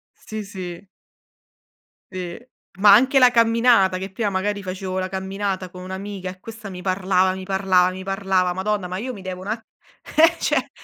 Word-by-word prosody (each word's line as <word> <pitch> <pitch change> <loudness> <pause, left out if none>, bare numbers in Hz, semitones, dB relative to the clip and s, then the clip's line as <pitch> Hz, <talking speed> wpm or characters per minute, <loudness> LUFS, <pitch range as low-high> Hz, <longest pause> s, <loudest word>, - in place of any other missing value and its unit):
Sì, 215 0 -7
sì. 185 -1 -8 1.3
Sì. 180 -2 -5 0.4
Ma 205 -1 +8
anche 265 +6 +6
la 250 -1 +7
camminata, 230 -4 +4
che 190 0 -6
prima, 205 +1 -2
magari, 200 +1 -1
facevo 185 0 -4
la 185 0 -2
camminata 190 -1 -3
con 180 -1 -10
un'amica 190 0 -6
e 185 0 -13
questa 220 -2 -9
mi 180 -1 -8
parlava, 185 0 +1
mi 190 0 -7
parlava, 190 -2 +3
mi 190 +1 -7
parlava. 190 -2 +1
Madonna, 190 0 -2
ma 185 - -4
io 255 +4 -4
mi 195 -4 -10
devo 185 0 -6
un'a 215 +4 -2 0.6
eh 330 +2 +6
cioè, - - 0
190 Hz, 170 wpm, -22 LUFS, 185-205 Hz, 1.3 s, Ma